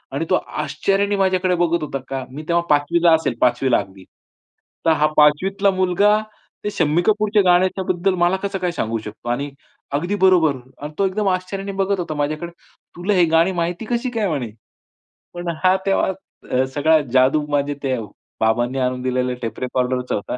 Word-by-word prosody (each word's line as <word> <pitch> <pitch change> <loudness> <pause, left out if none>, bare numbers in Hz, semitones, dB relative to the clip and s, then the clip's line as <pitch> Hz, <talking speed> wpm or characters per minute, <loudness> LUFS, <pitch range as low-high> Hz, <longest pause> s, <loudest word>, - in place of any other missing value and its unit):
आणि 160 - -1
तो 185 - +4
आश्चर्याने 195 +7 -1
माझ्याकडे 185 -2 +1
बघत 170 -2 +1
होता, 140 -2 -4
का 135 -1 -4
मी 150 +4 -7
तेव्हा 170 0 +2
5वीला 165 +3 +3
असेल, 145 -7 -1
5वीला 125 +1 +3
अगदी. 95 -1 -9 0.8
"तर 165 - +5
हा 155 -1 +3
5वीतला 195 +7 +3
मुलगा, 190 +3 +3 0.5
ते 210 - -1
शम्मी 165 -3 +1
कपूरच्या 215 0 +3
गाण्याच्याबद्दल 185 +1 +2
मला 175 +2 +3
कसं 195 -1 -2
काय 180 -1 -1
सांगू 115 -7 -2
शकतो? 110 +3 -8
आणि 140 +4 -2 0.5
अगदी 180 +5 -2
बरोबर." 160 -7 +4 0.2
अन् 150 +1 -7
तो 195 - +3
एकदम 200 +2 -2
आश्चर्याने 195 +2 -3
बघत 195 -1 -1
होता 165 -3 -3
माझ्याकडे. 155 +4 -2 0.4
"तुला 180 +4 -1
हे 180 -3 +4
गाणी 170 +3 +4
माहिती 175 +5 -3
कशी 240 +1 -1
काय?" 225 -4 -1
म्हणे. 125 -8 -3 0.8
पण 175 0 -5
हा 185 0 +5
तेव्हा 195 -1 +2 0.4
अ, 130 +1 +3
सगळा 155 +2 +4
जादू 135 +4 +3
माझ्या 145 0 0
ते 130 -1 0 0.4
बाबांनी 120 +4 +1
आणून 125 0 -1
दिलेल्या 125 0 -1
टेप 115 -2 -5
रेकॉर्डररचा 125 0 -1
होता 105 +4 -4
165 Hz, 170 wpm, -20 LUFS, 135-190 Hz, 0.8 s, तर